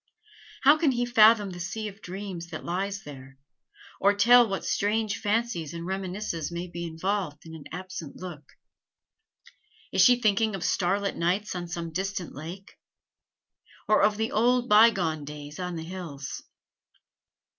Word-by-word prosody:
How 290 Hz, +3 st, +6 dB
can 300 Hz, -5 st, +3 dB
he 245 Hz, 0 st, 0 dB
fathom 220 Hz, -4 st, +5 dB
the 175 Hz, -, -8 dB
sea 215 Hz, +5 st, -4 dB
of 205 Hz, +1 st, -10 dB
dreams 185 Hz, -2 st, -6 dB
that 165 Hz, -2 st, -8 dB
lies 195 Hz, +3 st, -3 dB
there, 135 Hz, -3 st, -11 dB, 0.6 s
or 200 Hz, +1 st, +4 dB
tell 240 Hz, +4 st, +6 dB
what 195 Hz, -, -3 dB
strange 210 Hz, 0 st, 0 dB
fancies 210 Hz, -7 st, -1 dB
and 170 Hz, 0 st, -6 dB
reminiscences 190 Hz, -3 st, -3 dB
may 170 Hz, +1 st, -4 dB
be 170 Hz, -1 st, -6 dB
involved 165 Hz, -2 st, -3 dB
in 160 Hz, -, -10 dB
an 160 Hz, -3 st, -10 dB
absent 180 Hz, -4 st, -7 dB
look? 160 Hz, -6 st, -9 dB, 1.4 s
Is -, -, +3 dB
she 245 Hz, -1 st, +6 dB
thinking 215 Hz, -1 st, +2 dB
of 185 Hz, -, -5 dB
starlit 195 Hz, +2 st, 0 dB
nights 185 Hz, +5 st, 0 dB
on 175 Hz, -1 st, -5 dB
some 170 Hz, -1 st, -5 dB
distant 190 Hz, 0 st, -3 dB
lake, 170 Hz, +7 st, -9 dB, 1.1 s
or 215 Hz, -, +4 dB
of 210 Hz, +1 st, +3 dB
the 220 Hz, 0 st, -1 dB
old 245 Hz, +3 st, +2 dB
bygone 195 Hz, -9 st, +4 dB
days 150 Hz, +1 st, -9 dB
on 180 Hz, -1 st, -3 dB
the 160 Hz, -, -5 dB
hills? 165 Hz, -6 st, -7 dB
190 Hz, 150 wpm, -27 LUFS, 170-210 Hz, 1.4 s, How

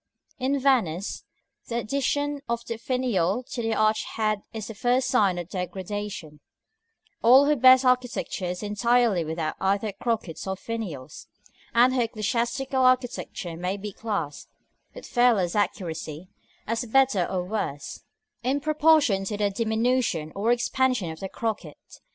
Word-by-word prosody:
In 270 Hz, +2 st, 0 dB
Venice, 220 Hz, -, 0 dB, 0.4 s
the 235 Hz, -, -2 dB
addition 280 Hz, +4 st, -1 dB
of 235 Hz, 0 st, -2 dB
the 230 Hz, -, -4 dB
finial 245 Hz, -4 st, 0 dB
to 240 Hz, -, -3 dB
the 225 Hz, -1 st, 0 dB
arch 215 Hz, 0 st, +2 dB
head 215 Hz, -2 st, 0 dB
is 220 Hz, -2 st, -6 dB
the 225 Hz, -, -7 dB
first 250 Hz, +4 st, +1 dB
sign 200 Hz, -8 st, +3 dB
of 175 Hz, -2 st, -4 dB
degradation; 190 Hz, -3 st, -5 dB, 0.8 s
all 260 Hz, +4 st, +7 dB
her 300 Hz, +1 st, +3 dB
best 260 Hz, 0 st, +7 dB
architecture 250 Hz, -6 st, 0 dB
is 180 Hz, +3 st, -4 dB
entirely 220 Hz, -2 st, +2 dB
without 160 Hz, 0 st, -3 dB
either 200 Hz, +2 st, 0 dB
crockets 200 Hz, -4 st, -3 dB
or 190 Hz, -, -1 dB
finials; 185 Hz, -, -6 dB, 0.5 s
and 245 Hz, +2 st, +5 dB
her 255 Hz, -, +2 dB
ecclesiastical 235 Hz, +4 st, -1 dB
architecture 245 Hz, -8 st, 0 dB
may 180 Hz, +4 st, -2 dB
be 205 Hz, +1 st, -6 dB
classed, 200 Hz, -11 st, -4 dB, 0.5 s
with -, -, -9 dB
fearless 225 Hz, -8 st, +2 dB
accuracy, 165 Hz, -4 st, -3 dB, 0.4 s
as 230 Hz, +2 st, -1 dB
better 240 Hz, -6 st, +3 dB
or 185 Hz, -2 st, -1 dB
worse, 180 Hz, -7 st, -4 dB, 0.4 s
in 265 Hz, +4 st, 0 dB
proportion 305 Hz, -8 st, +3 dB
to 210 Hz, +1 st, -3 dB
the 205 Hz, -1 st, +1 dB
diminution 220 Hz, -6 st, 0 dB
or 210 Hz, +4 st, +1 dB
expansion 245 Hz, -5 st, +1 dB
of 160 Hz, -, -9 dB
the 195 Hz, -, -5 dB
crocket. 210 Hz, -10 st, -4 dB
220 Hz, 140 wpm, -26 LUFS, 190-250 Hz, 0.8 s, all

